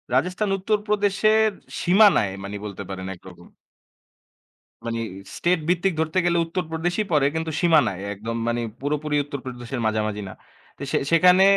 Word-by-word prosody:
রাজেস্থান 180 +8 +1
উত্তরপ্রদেশের 210 +1 +2 0.3
সীমানায়, 180 - +5
মানি 100 +1 -5
বলতে 100 -1 -6
পারেন 95 0 -5
একরকম 90 -1 -14 1.4
মানি 115 0 -2 0.4
স্টেট 175 -1 +2
ভিত্তিক 180 +1 +2
ধরতে 160 +3 -1
গেলে 170 0 +2
উত্তরপ্রদেশই 175 +3 -2
পরে, 145 -3 +3
কিন্তু 160 0 -2
সীমানায়। 150 - +3
একদম 115 +3 -5
মানি 120 0 0 0.2
পুরোপুরি 150 +1 -1
উত্তরপ্রদেশের 130 -3 -6
মাঝামাঝি 110 -1 -1
না। - - -8 0.4
তো - - -15
সে - - +2
সেখানে 180 +3 +6
160 Hz, 130 wpm, -23 LUFS, 115-185 Hz, 1.4 s, সেখানে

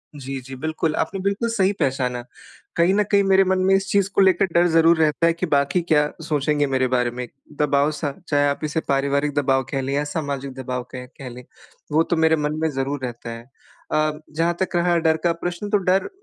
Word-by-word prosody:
जी, 135 -1 -6
जी 130 +1 -9
बिल्कुल। 155 +2 -2
आपने 195 - -3
बिल्कुल 200 +4 -1
सही 200 -4 +2
पहचाना। 125 -2 -1 0.5
कहीं 170 +3 +3
न 210 - +3
कहीं 200 0 +4
मेरे 195 0 +4
मन 185 0 +1
में 190 - +4
इस 195 +1 0
चीज़ 200 -1 +2
को - - +5
लेके 190 -1 +4
डर 175 -1 +2
ज़रूर 165 0 +4
रहता 155 +1 +2
है 170 - +3
कि 170 +2 -3
बाकी 140 +2 +1
क्या 150 -3 +2
सोचेंगे 145 -1 0
मेरे 130 -1 +1
बारे 125 -1 +1
में? 125 0 -6 0.3
दबाव 145 0 +2
सा 150 -1 -3 0.2
चाहे 145 -1 +2
आप 140 - -3
इसे 155 +1 -1
पारिवारिक 140 +1 +1
दबाव 135 -2 +2
कह 135 -1 -1
लें 135 +1 -3
या 145 - +1
सामाजिक 140 -3 -4
दबाव 125 -1 -4
कहें 125 -1 -7
कह 135 -2 -7
लें 125 +1 -10 0.5
वो 155 +2 +4
तो 170 - -1
मेरे 160 0 +4
मन 150 0 -2
में 160 - +1
ज़रूर 135 +1 -2
रहता 120 -1 -6
है। 115 +2 -9 0.4
अ, 155 0 +2 0.2
जहाँ 165 +2 +1
तक 190 -1 -2
रहा 175 0 +2
डर 160 -1 +2
का 170 - +3
प्रश्न 175 +4 -3
तो 205 - +3
डर 190 0 +1
150 Hz, 220 wpm, -22 LUFS, 135-175 Hz, 0.5 s, को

